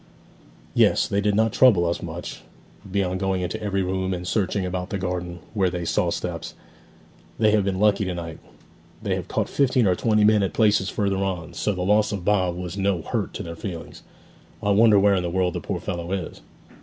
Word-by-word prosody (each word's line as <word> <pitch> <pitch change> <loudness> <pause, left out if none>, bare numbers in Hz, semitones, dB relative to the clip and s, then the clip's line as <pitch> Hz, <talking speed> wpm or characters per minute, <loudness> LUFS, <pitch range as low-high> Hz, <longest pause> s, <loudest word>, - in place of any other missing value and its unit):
'Yes. - - +3
They 100 - 0
did 105 0 +1
not 110 0 +2
trouble 105 -10 +5
us 85 0 -1
much, - - -7 0.5
beyond 95 -2 0
going 95 -1 0
into 90 - -4
every 100 -2 -1
room, 95 0 -1
and 90 0 -6
searching 100 -1 0
about 90 +1 -3
the 100 - -2
garden, 90 -2 -3 0.2
where 95 -4 +2
they 90 -1 -4
saw - - +1
steps. - - -4 0.8
They 110 -1 +4
have 105 -1 +3
been 95 -1 -1
lucky 105 -1 +3
to 90 -1 -3
night; 85 -2 -6 0.6
they - - 0
have - - -3
caught - - -1
fifteen 130 -4 +2
or 95 - +4
twenty 105 +3 +2
men 105 0 +5
at 95 -4 -1
places 105 -3 +3
further 100 -3 0
on; 95 -4 -3
so 105 - -1
the 90 -1 -3
loss 105 +3 +3
of 95 -4 -4
Bob 95 -4 +2
was 90 0 -5
no 95 -4 0
hurt - - -2
to - - -4
their 85 0 -7
feelings. 85 -1 -7 0.6
I 100 - +2
wonder 105 +1 +6
where 100 0 +5
in 95 - +1
the 90 - -2
world 90 0 0
the - - -4
poor - - -3
fellow 85 0 -5
is!' 95 -4 -4
95 Hz, 210 wpm, -24 LUFS, 90-105 Hz, 0.8 s, wonder